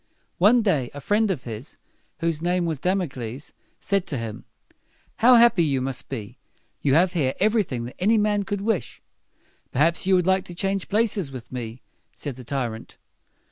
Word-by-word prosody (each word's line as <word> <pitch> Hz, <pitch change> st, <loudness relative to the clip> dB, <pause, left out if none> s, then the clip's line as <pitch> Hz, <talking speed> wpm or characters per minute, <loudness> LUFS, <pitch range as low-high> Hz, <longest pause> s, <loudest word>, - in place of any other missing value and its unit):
One 225 Hz, +6 st, +5 dB
day 145 Hz, -, +1 dB
a -, -, -5 dB
friend 210 Hz, +8 st, +1 dB
of 160 Hz, -10 st, -2 dB
his, 115 Hz, +4 st, -8 dB, 0.4 s
whose 165 Hz, -2 st, 0 dB
name 175 Hz, +1 st, +1 dB
was 160 Hz, -4 st, -2 dB
Dam´o 185 Hz, +1 st, +1 dB
cles, 125 Hz, +1 st, -7 dB, 0.3 s
said 195 Hz, -2 st, 0 dB
to 140 Hz, -, -3 dB
him, 115 Hz, -2 st, -6 dB, 0.7 s
"How 250 Hz, +2 st, +7 dB
happy 235 Hz, -7 st, +6 dB
you 140 Hz, -4 st, +1 dB
must 130 Hz, 0 st, -3 dB
be! 110 Hz, -7 st, -6 dB, 0.4 s
You 135 Hz, -1 st, +3 dB
have 180 Hz, +2 st, +4 dB
here 135 Hz, -6 st, 0 dB
everything 200 Hz, -, +1 dB
that 120 Hz, -, -10 dB
any 215 Hz, +5 st, +3 dB
man 210 Hz, -1 st, +2 dB
could 200 Hz, 0 st, -3 dB
wish." 200 Hz, -, -2 dB, 0.7 s
"Perhaps 165 Hz, +6 st, +1 dB
you 190 Hz, -, +5 dB
would 180 Hz, -2 st, +2 dB
like 190 Hz, 0 st, +2 dB
to 175 Hz, -, -9 dB
change 195 Hz, +1 st, -1 dB
places 205 Hz, -7 st, +1 dB
with 130 Hz, -3 st, -9 dB
me," 120 Hz, -1 st, -6 dB, 0.3 s
said 145 Hz, -4 st, -5 dB
the 130 Hz, -, -10 dB
tyrant. 120 Hz, -3 st, -4 dB
170 Hz, 180 wpm, -24 LUFS, 130-195 Hz, 0.7 s, How